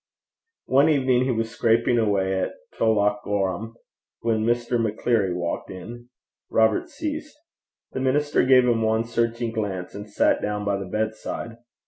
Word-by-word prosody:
One 140 Hz, +4 st, +4 dB
evening 130 Hz, -4 st, +3 dB
he 130 Hz, -, +1 dB
was 115 Hz, -1 st, -1 dB
scraping 115 Hz, +1 st, +2 dB
away 95 Hz, -3 st, +1 dB
at -, -, -2 dB, 0.2 s
Tullochgorum 105 Hz, -1 st, 0 dB, 0.5 s
when 110 Hz, -2 st, +1 dB
Mr. 120 Hz, +1 st, +1 dB
Maccleary 110 Hz, -2 st, +1 dB
walked 85 Hz, -1 st, -3 dB
in. 120 Hz, +7 st, -9 dB, 0.4 s
Robert 110 Hz, -1 st, +2 dB
ceased. 310 Hz, -1 st, -5 dB, 0.5 s
The -, -, -4 dB
minister 145 Hz, +3 st, +2 dB
gave 130 Hz, -1 st, +6 dB
him 115 Hz, -2 st, +2 dB
one 110 Hz, 0 st, +2 dB
searching 115 Hz, 0 st, -1 dB
glance, 100 Hz, -5 st, -4 dB
and 105 Hz, +1 st, -8 dB
sat 105 Hz, -, +2 dB
down 105 Hz, 0 st, -2 dB
by 100 Hz, -1 st, 0 dB
the 100 Hz, -, -5 dB
bedside. 110 Hz, +2 st, -3 dB
115 Hz, 140 wpm, -24 LUFS, 105-120 Hz, 0.5 s, gave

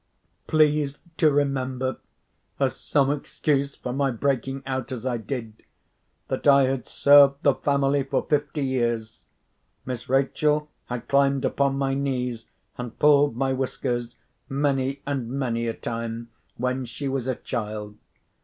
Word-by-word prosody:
Please 150 Hz, -2 st, +2 dB, 0.2 s
to 155 Hz, -, +5 dB
remember, 130 Hz, -2 st, 0 dB, 0.6 s
as -, -, +1 dB
some 140 Hz, -2 st, +1 dB
excuse 140 Hz, -1 st, -1 dB
for 125 Hz, -, -5 dB
my 140 Hz, +1 st, +1 dB
breaking 135 Hz, +2 st, -1 dB
out 130 Hz, 0 st, -3 dB
as 125 Hz, -2 st, -5 dB
I 125 Hz, -2 st, 0 dB
did, 110 Hz, -1 st, -6 dB, 0.7 s
that -, -, -2 dB
I 140 Hz, -1 st, +7 dB
had 130 Hz, -1 st, -1 dB
served 140 Hz, -1 st, +6 dB
the 140 Hz, -, +5 dB
family 140 Hz, 0 st, +1 dB
for 135 Hz, -, -1 dB
fifty 145 Hz, 0 st, 0 dB
years. 120 Hz, -4 st, -1 dB, 0.6 s
Miss 125 Hz, -2 st, -5 dB
Rachel 150 Hz, +3 st, +1 dB, 0.2 s
had 120 Hz, -1 st, -5 dB
climbed 140 Hz, -1 st, +3 dB
upon 135 Hz, +1 st, +1 dB
my 135 Hz, -1 st, 0 dB
knees, 125 Hz, -4 st, -2 dB, 0.3 s
and 125 Hz, -2 st, -6 dB
pulled 145 Hz, -3 st, +5 dB
my 135 Hz, 0 st, +1 dB
whiskers, 125 Hz, -2 st, -2 dB, 0.3 s
many 135 Hz, -1 st, 0 dB
and 135 Hz, -5 st, -2 dB
many 120 Hz, -3 st, -1 dB
a 115 Hz, -, -1 dB
time 115 Hz, 0 st, -5 dB, 0.3 s
when 125 Hz, +2 st, -1 dB
she 125 Hz, +4 st, -5 dB
was 135 Hz, -2 st, -2 dB
a 130 Hz, -, 0 dB
child. 105 Hz, -4 st, -5 dB
135 Hz, 140 wpm, -25 LUFS, 125-140 Hz, 0.7 s, I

